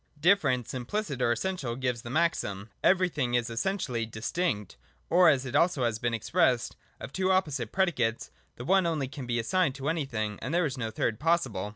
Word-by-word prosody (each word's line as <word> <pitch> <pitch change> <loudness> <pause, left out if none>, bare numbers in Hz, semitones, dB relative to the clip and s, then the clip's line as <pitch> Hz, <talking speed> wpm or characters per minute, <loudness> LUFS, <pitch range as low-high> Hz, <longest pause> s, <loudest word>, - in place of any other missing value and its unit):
Difference 150 - +2
implicit 135 - -3
or 120 - +3
essential 140 -5 -2
gives 125 -2 -2
the 120 - -8
maxim, 120 - -1
Everything 165 -10 +2
is 120 -1 0
essentially 125 -3 -1
distinct; 110 - -2 0.4
or, 175 0 +7
as 135 -3 +2
it 130 - -6
has 170 +3 +3
also 120 -4 0
been 120 - 0
expressed. 125 - +1 0.2
Of - - -8
two 190 0 +1
opposite 150 - 0
predicates 135 -12 0 0.2
the 120 - -8
one 190 +2 +3
only 155 -5 -1
can 135 -1 -8
be 120 0 0
assigned 150 +4 +1
to 140 +1 -3
anything, 115 -10 -2
and 150 +6 -2
there 175 -1 +3
is 135 -3 -2
no 115 -4 -3
third 110 0 -1
possible. 135 - 0
135 Hz, 185 wpm, -28 LUFS, 120-170 Hz, 0.4 s, or